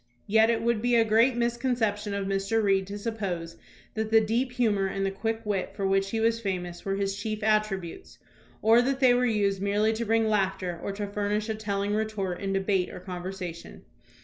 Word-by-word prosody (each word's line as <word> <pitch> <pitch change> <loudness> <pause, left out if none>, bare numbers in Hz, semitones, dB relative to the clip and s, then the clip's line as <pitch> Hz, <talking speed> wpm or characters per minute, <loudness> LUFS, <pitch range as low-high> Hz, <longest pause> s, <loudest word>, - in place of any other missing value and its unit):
Yet 220 +2 +4
it 225 -1 +1
would 235 -2 +1
be 245 0 +2
a 230 -1 +5
great 230 +4 +4
misconception 235 -4 0
of 200 -1 -2
Mr. 195 +3 0
Reed 195 -2 +2
to 200 +1 -5
suppose 190 -7 -4 0.4
that 220 0 -2
the 225 0 +6
deep 235 +4 0
humor 215 -6 +1
and 195 0 -2
the 195 - 0
quick 225 +3 -3
wit 200 -3 -2
for 195 - -2
which 195 0 +1
he 225 - -2
was 230 +1 +2
famous 180 -4 -4
were 195 0 -1
his 195 0 -1
chief 215 +1 -4
attributes, 215 - -1 0.5
or 225 +2 +6
that 270 +2 -1
they 255 -2 +6
were 250 +1 +2
used 200 -4 +1
merely 205 +2 +2
to 225 +1 -2
bring 225 0 +2
laughter 190 -4 0
or - - -3
to 205 +1 -3
furnish 205 +1 -2
a - - +1
teUing 205 -1 -2
retort 205 -4 -2
in 195 -1 -2
debate 195 -1 +1
or - - -8
conversation. 180 -1 -7
205 Hz, 200 wpm, -27 LUFS, 195-225 Hz, 0.5 s, the